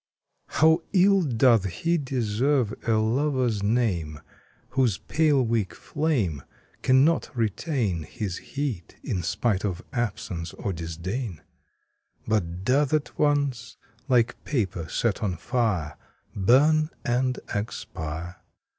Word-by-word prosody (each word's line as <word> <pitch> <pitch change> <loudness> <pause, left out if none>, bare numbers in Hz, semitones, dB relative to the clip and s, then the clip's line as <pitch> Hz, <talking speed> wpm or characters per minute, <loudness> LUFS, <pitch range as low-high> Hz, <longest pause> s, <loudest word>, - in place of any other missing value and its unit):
HOW 160 +3 +4
ill 195 +1 +5
doth 115 - +2
lie 170 +1 +4
deserve 125 -1 +1
a 115 - +3
Lover's 120 0 +1
name 100 -9 0 0.5
Whose 125 -8 +2
pale 150 -2 +2
weak 110 -4 -1
flame 120 - -1 0.4
Cannot 135 +5 +3
retain 110 - 0
His 95 -1 -4
heat, 135 - -4
in 90 - -2
spite 100 +3 0
of 95 0 -2
absence 95 - -3
or 100 - -3
disdain; 85 - -4 0.9
But 90 -5 -1
doth 140 +4 +2
at 150 - -3
once, 140 -6 0 0.3
like 120 -2 +2
paper 95 - -2
set 115 0 0
on 95 -5 -1
fire, 90 - -1 0.4
Burn 150 +10 +4 0.2
and 125 +1 +1
expire 85 -4 -5
115 Hz, 110 wpm, -26 LUFS, 95-135 Hz, 0.9 s, ill